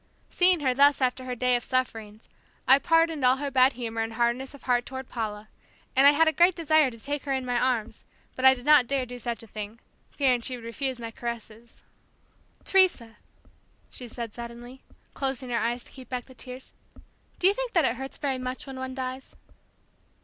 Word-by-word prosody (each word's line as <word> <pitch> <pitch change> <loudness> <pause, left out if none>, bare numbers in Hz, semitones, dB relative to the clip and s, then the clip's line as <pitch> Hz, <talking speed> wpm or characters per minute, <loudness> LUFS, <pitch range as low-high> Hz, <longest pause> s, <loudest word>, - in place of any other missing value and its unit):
Seeing 360 -2 +3
her 260 -3 +2
thus 285 +2 +5
after 255 0 0
her 250 -1 -4
day 250 +1 +2
of 240 - -1
sufferings, 225 -4 -3 0.4
I 265 +1 +7
pardoned 330 -2 +2
all 255 +1 +5
her 280 0 -4
bad 260 0 +5
humor 230 -2 -4
and 225 0 -3
hardness 240 +4 -1
of 280 - -16
heart 245 -1 +2
toward 260 0 -7
Paula; 215 -2 -5 0.5
and 270 +2 +7
I - - +9
had 320 +2 +3
a - - +5
great 345 +4 +4
desire 315 -4 +3
to 230 - -11
take 285 +4 -4
her 275 - -1
in 260 -1 -2
my 245 -1 0
arms 240 -3 -1 0.3
but 255 - -6
I 265 0 +8
did 245 0 -12
not 295 -5 +6
dare 270 -1 0
do 245 0 -9
such 235 -1 -4
a - - -13
thing 215 +1 -7 0.3
fearing 255 -4 +1
she 255 +2 -3
would 230 - -12
refuse 260 +3 -3
my 230 -1 -6
caresses. 235 0 -8 0.8
"Teresa," 310 - +2 0.7
she 250 - -7
said 230 -2 -7
suddenly, 240 +2 -9 0.3
closing 265 -2 -3
her 235 - +1
eyes 240 +1 -1
to - - -16
keep 260 -2 -13
back 250 -2 -4
the 260 - -15
tears, 255 +1 -10 0.6
"do - - -2
you 390 - +6
think - - -4
that 335 -4 +4
it 235 - 0
hurts 270 +1 -7
very 270 -3 -2
much 255 +2 -5
when 270 -1 -8
one 260 0 -5
dies?" 260 0 -6
255 Hz, 210 wpm, -27 LUFS, 235-275 Hz, 0.8 s, I